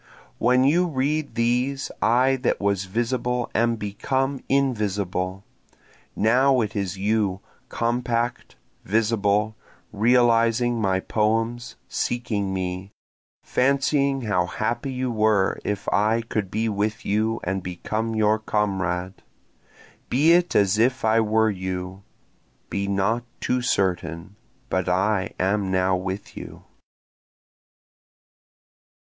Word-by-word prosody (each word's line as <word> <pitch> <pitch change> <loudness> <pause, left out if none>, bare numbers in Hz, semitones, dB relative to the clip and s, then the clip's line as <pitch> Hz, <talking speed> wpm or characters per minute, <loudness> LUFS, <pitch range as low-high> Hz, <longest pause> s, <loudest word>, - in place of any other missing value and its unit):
When 125 +2 +4
you 170 +6 +3
read 150 +1 -1
these 125 +4 0
I 130 +3 +3
that 125 - 0
was 100 -1 0
visible 120 +4 -1
am 115 +1 +2
become 130 +6 -2
invisible, 100 -8 -1 0.7
Now 130 +5 +3
it 110 +1 -3
is 100 -2 -2
you, 100 -1 0 0.3
compact, 120 0 -1 0.3
visible, 105 0 +1 0.4
realizing 115 +1 +3
my 95 -2 +1
poems, 115 +3 -1
seeking 110 -5 -2
me, 95 0 -3 0.5
Fancying 140 +1 +1
how 90 -5 +1
happy 115 +8 -2
you 130 -1 -2
were 110 -3 +2
if 100 -1 -3
I 110 +3 +2
could 110 -4 -3
be 110 +3 -1
with 105 +1 -2
you 110 +2 0
and 95 +1 -2
become 110 +6 -3
your 110 0 +2
comrade; 95 -4 -2 0.9
Be 145 +7 +4
it 175 0 +3
as 100 +1 +3
if 125 +1 +2
I 110 +1 +4
were 110 0 +2
with 100 - -4
you. 95 +1 -5 0.7
(Be 100 0 -1
not 100 +4 0 0.2
too 125 0 0
certain 90 -5 -1 0.3
but 95 -4 -1
I 95 +1 0
am 95 +1 +1
now 95 0 +2
with 95 +2 -5
you.) - - -9
110 Hz, 115 wpm, -24 LUFS, 100-120 Hz, 0.9 s, When